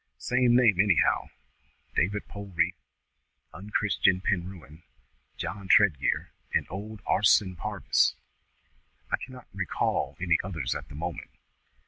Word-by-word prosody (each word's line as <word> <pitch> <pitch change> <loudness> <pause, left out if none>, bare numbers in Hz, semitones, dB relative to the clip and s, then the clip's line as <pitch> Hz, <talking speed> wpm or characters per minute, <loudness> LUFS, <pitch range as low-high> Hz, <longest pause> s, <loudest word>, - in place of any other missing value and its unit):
Same 125 -1 +2
name, 120 -7 +5
anyhow. 100 -3 +3 0.7
David 100 +5 0
Polreath, 95 -4 -2 0.8
Unchris'en 100 -1 +1
Penrewen, 90 -4 -3 0.6
John 100 -1 -5
Tredgear, 95 -9 +3 0.2
and - - +1
old 105 +2 -7
Arson 95 -2 +3
Parvis." - - +1 1.0
"I - - +2
cannot 130 -1 -10
recall 95 -2 -1
any 90 -2 +2
others 80 -10 -3
at - - -7
the 75 - -10
moment." 85 -1 -5
95 Hz, 105 wpm, -28 LUFS, 85-105 Hz, 1.0 s, name